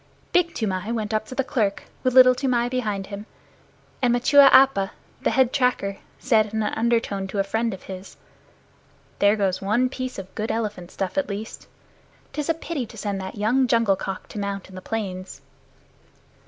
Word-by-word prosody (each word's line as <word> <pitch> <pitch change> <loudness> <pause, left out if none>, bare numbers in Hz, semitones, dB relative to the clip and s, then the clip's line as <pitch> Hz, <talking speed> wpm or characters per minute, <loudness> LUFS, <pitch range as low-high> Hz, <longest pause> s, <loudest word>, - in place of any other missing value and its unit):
Big 345 -1 +2
Toomai 205 -1 -2
went 220 -2 -2
up 215 0 -1
to 255 - -8
the 270 - +1
clerk 215 -6 -1 0.2
with 255 -1 0
Little 255 -1 +9
Toomai 250 -2 0
behind 215 -6 -2
him, 200 +2 -8 0.7
and 250 -2 +3
Machua 275 +3 +6
Appa, 260 -8 +5 0.3
the - - +1
head 260 -2 +2
tracker, 250 -7 +1 0.2
said 220 -4 +2
in 220 - +1
an 210 - -2
undertone 225 -4 0
to 195 - -6
a 195 - +3
friend 225 +4 -1
of 190 - -8
his, 190 0 -9 1.0
"There 205 +1 +5
goes 195 -3 0
one 225 +6 +1
piece 255 -1 -5
of 190 -1 -8
good 220 0 -3
elephant 210 -6 -3
stuff 195 +11 -2
at 285 - -2
least. 205 +2 -6 0.7
'Tis 300 0 -3
a 330 - +3
pity 320 -6 -4
to 225 - -13
send 200 -2 -3
that 190 - -6
young 245 +5 +2
jungle 230 -4 +3
cock 190 0 -6
to 210 - -6
molt 200 -1 -4
in - - -14
the 185 - -8
plains." 190 -4 -5
220 Hz, 185 wpm, -24 LUFS, 200-255 Hz, 1.0 s, Little